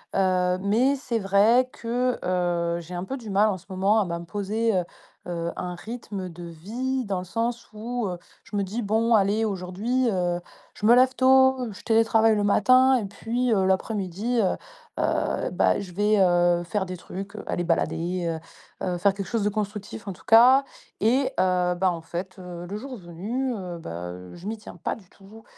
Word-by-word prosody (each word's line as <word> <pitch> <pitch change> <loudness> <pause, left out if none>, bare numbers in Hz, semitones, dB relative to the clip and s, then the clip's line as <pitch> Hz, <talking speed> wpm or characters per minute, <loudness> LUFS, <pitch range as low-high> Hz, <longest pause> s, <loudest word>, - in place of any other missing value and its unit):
heu, 185 -1 +2
mais 235 +8 +3
c'est 255 -4 -2
vrai 210 +6 +4
que, 245 +2 -1
heu, 175 -2 0
j'ai 170 +2 -10
un 175 0 -3
peu 265 +8 -4
du 230 -4 -9
mal, 205 +2 +4
en 195 - -1
ce 170 - -18
moment, 195 +3 +2
à - - 0
m'imposer, 200 +6 -1
heu 180 - +1 0.4
heu, 170 -1 -3
un 180 0 -4
rythme 205 -2 -6
de 175 +1 -10
vie, 235 +11 -3
dans 195 -3 -2
le 180 - -7
sens 230 +5 -2
où 235 +1 -3
heu, 180 - -4 0.3
je - - -9
me 200 - +1
dis: 205 +5 -3
«Bon, 225 +2 +1
allez, 210 +1 +3
aujourd'hui, 205 +6 -1
heu, 175 -3 0 0.3
je 210 - -5
me 235 - +8
lève 255 +1 +5
tôt, 260 -2 +4
je 200 - -12
télétravaille 225 0 +4
le 205 - 0
matin 255 +6 +5
et 225 - -2
puis 230 +5 -2
heu, 190 -3 +2
l'après-midi, 195 +4 0
heu 190 - +1 0.4
heu, - - 0
bah, - - +2
je 190 -3 -7
vais, 210 +3 +2
heu, 175 -1 +3
faire 190 +3 -2
des 185 0 -5
trucs, 195 +3 -8
aller 175 - -2
balader, 165 0 -1 0.4
heu - - -2
heu, 180 -1 -1
faire 195 +3 +3
quelque 195 -1 -5
chose 225 +1 -1
de 205 - +2
constructif, 210 0 -5
en 195 - -3
tout - - -19
cas» 250 +5 +7 0.4
et 250 +6 +3
heu, 180 -1 +2
bah, 185 +1 +2
en 170 -1 -5
fait, 180 +4 -6
heu, 175 -1 -8
le 200 +4 -5
jour 255 +3 -7
venu, 210 +9 -3
heu, 180 -4 -6
bah, 90 - -6
heu, 90 0 -11
je 175 +3 -9
m'y 220 +1 -3
tiens 210 - -12
pas - - -2
du 195 -5 -17
tout, 210 +3 -15
200 Hz, 200 wpm, -25 LUFS, 180-230 Hz, 0.4 s, me